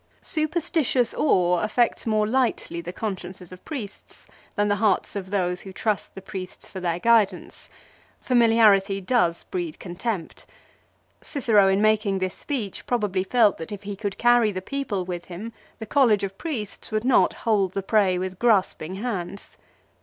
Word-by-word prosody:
Superstitious 310 -6 0
awe 180 - +2
affects 230 +5 0
more 215 -1 +2
lightly 230 -7 0
the 170 - -6
consciences 185 -3 -6
of 185 - -12
priests 235 -10 -8 0.3
than 205 0 +1
the 205 0 +1
hearts 205 -2 +1
of 190 -2 -5
those 180 -3 -1
who 195 - -9
trust 210 +1 -2
the 195 - -9
priests 190 -2 -8
for 190 - -6
their 170 -2 -1
guidance. 225 +1 +1 0.5
Familiarity 225 -5 +4
does 185 -5 +1
breed 175 -4 -4
contempt. 185 0 -5 0.7
Cicero 225 -9 +3
in 195 +2 +2
making 215 -2 +2
this 185 -1 -2
speech 235 -10 -5
probably 210 -6 0
felt 220 0 +3
that 160 - -7
if 205 -1 -7
he 200 0 -5
could 200 -1 -4
carry 240 -2 +4
the 185 - -4
people 205 -4 -3
with 175 -1 -5
him 205 +6 -8 0.2
the 220 - -7
College 225 -4 +3
of 195 -1 -3
Priests 230 - -5
would 215 +2 -1
not 255 - +4
hold 200 -5 +2
the 195 - -3
prey 195 -3 +2
with 185 0 -4
grasping 195 -6 +1
hands. 200 -3 -5
205 Hz, 160 wpm, -24 LUFS, 185-230 Hz, 0.7 s, Familiarity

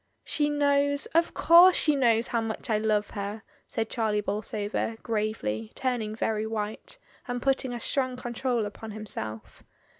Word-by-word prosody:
"She 295 -1 0
knows, 285 -1 +2
of 335 +1 +2
course 350 +2 +7
she 300 -2 +5
knows 235 -4 +3
how 235 -2 -1
much 225 0 -4
I 215 - +2
love 215 -1 0
her," 205 +2 -5 0.2
said 225 0 -2
Charlie 220 -3 0
Bolsover, 210 +2 -3
gravely, 210 - -2
turning 235 -5 -2
very 220 -1 -1
white, 215 -1 -4 0.3
and 245 -1 -2
putting 265 0 +1
a 240 - -4
strong 255 0 -1
control 240 -1 -1
upon 215 +2 -8
him 215 0 -7
self. 110 - -6
225 Hz, 155 wpm, -27 LUFS, 210-260 Hz, 0.3 s, course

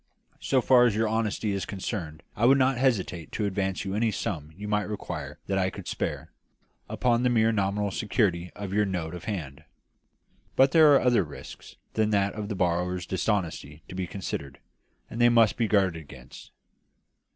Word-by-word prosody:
So 130 -2 +1
far 125 -2 +6
as 115 -4 +2
your 110 +1 +1
honesty 110 -1 -1
is 100 -1 -2
concerned 90 -6 -5
I 110 - +1
would 135 +1 +6
not 135 0 +3
hesitate 95 - 0
to 105 - -1
advance 95 -1 -2
you 95 - -3
any 110 +2 +1
sum 80 -7 -4
you 105 +3 -7
might 105 0 0
require 75 -8 -6
that 95 0 0
I 95 0 +1
could - - -10
spare, - - -4 0.6
upon 120 -1 +1
the 125 - +2
mere 115 -2 +3
nominal 100 -1 0
security 95 -5 0
of 100 -2 -6
your 105 +1 +3
note 90 -4 -3
of 90 - -8
hand. 75 -8 -5 0.9
But 135 +1 +5
there 160 -3 +7
are - - +4
other 120 -5 +3
risks 75 -3 -11 0.2
than 110 -1 +1
that 100 -2 +1
of 105 -1 -5
the 105 - -3
borrower's 90 0 0
dishonesty 85 -6 -2
to - - -8
be 90 -1 -3
considered, 70 -8 -5 0.5
and 115 - -5
they 120 - +7
must 115 -3 +4
be 115 - 0
guarded 95 -6 +2
against. 65 -4 -13
100 Hz, 185 wpm, -27 LUFS, 90-110 Hz, 0.9 s, there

